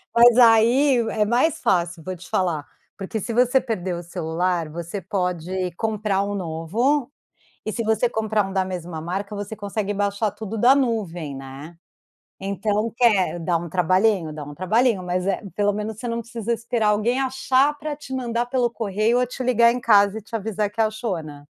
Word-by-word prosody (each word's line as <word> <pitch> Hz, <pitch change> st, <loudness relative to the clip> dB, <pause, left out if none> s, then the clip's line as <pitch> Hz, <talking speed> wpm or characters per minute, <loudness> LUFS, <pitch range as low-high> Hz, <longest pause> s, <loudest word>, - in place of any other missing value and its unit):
Mas 240 Hz, 0 st, +7 dB
aí 240 Hz, +4 st, +5 dB
é 210 Hz, -1 st, +1 dB
mais 245 Hz, +9 st, +2 dB
fácil, 175 Hz, -3 st, 0 dB
vou 185 Hz, +1 st, -5 dB
te 175 Hz, -, -13 dB
falar, 170 Hz, -6 st, 0 dB, 0.3 s
porque 200 Hz, +2 st, -4 dB
se 230 Hz, +3 st, -4 dB
você 250 Hz, +2 st, +4 dB
perder 190 Hz, -7 st, -3 dB
o 175 Hz, -, -6 dB
celular, 170 Hz, 0 st, -2 dB
você 170 Hz, +4 st, -6 dB
pode 180 Hz, -1 st, -2 dB
comprar 210 Hz, -2 st, -1 dB
um 205 Hz, 0 st, -3 dB
novo 215 Hz, -, -1 dB, 0.5 s
e 215 Hz, -, -2 dB
se 230 Hz, -, -3 dB
você 220 Hz, +2 st, +1 dB
comprar 215 Hz, -2 st, 0 dB
um 195 Hz, -, -7 dB
da 190 Hz, -1 st, +1 dB
mesma 175 Hz, -3 st, -5 dB
marca, 195 Hz, +5 st, -4 dB
você 205 Hz, +2 st, -5 dB
consegue 205 Hz, 0 st, -3 dB
baixar 200 Hz, +1 st, 0 dB
tudo 220 Hz, +1 st, -6 dB
da 250 Hz, +5 st, +6 dB
nuvem, 185 Hz, -, -1 dB
né. 135 Hz, +5 st, -9 dB, 0.7 s
Então 205 Hz, +3 st, -1 dB
quer 210 Hz, -8 st, +3 dB
dá 170 Hz, 0 st, 0 dB
um 170 Hz, +1 st, -6 dB
trabalhinho, 185 Hz, 0 st, +2 dB
dá 150 Hz, -1 st, -7 dB
um 145 Hz, 0 st, -9 dB
trabalhinho, 210 Hz, -, +1 dB
mas 180 Hz, +1 st, -2 dB
eh, 195 Hz, -, 0 dB
pelo 205 Hz, -1 st, +2 dB
menos 210 Hz, +1 st, -4 dB
você 245 Hz, -, -5 dB
não 230 Hz, 0 st, -2 dB
precisa 230 Hz, 0 st, -3 dB
esperar 230 Hz, -2 st, 0 dB
alguém 225 Hz, +5 st, +1 dB
achar 265 Hz, +2 st, +1 dB
pra 300 Hz, -1 st, -4 dB
te 265 Hz, -3 st, -9 dB
mandar 240 Hz, -2 st, -1 dB
pelo 245 Hz, -1 st, 0 dB
correio 220 Hz, +2 st, 0 dB
ou 250 Hz, -, +2 dB
te 255 Hz, +1 st, -6 dB
ligar 235 Hz, -1 st, +4 dB
em 250 Hz, -, -3 dB
casa 205 Hz, -1 st, +4 dB
e -, -, -14 dB
te 225 Hz, -, -23 dB
avisar 210 Hz, -1 st, -1 dB
que 225 Hz, +2 st, -13 dB
achou, 220 Hz, -3 st, -1 dB
né. 145 Hz, -1 st, -11 dB
210 Hz, 190 wpm, -23 LUFS, 180-235 Hz, 0.7 s, Mas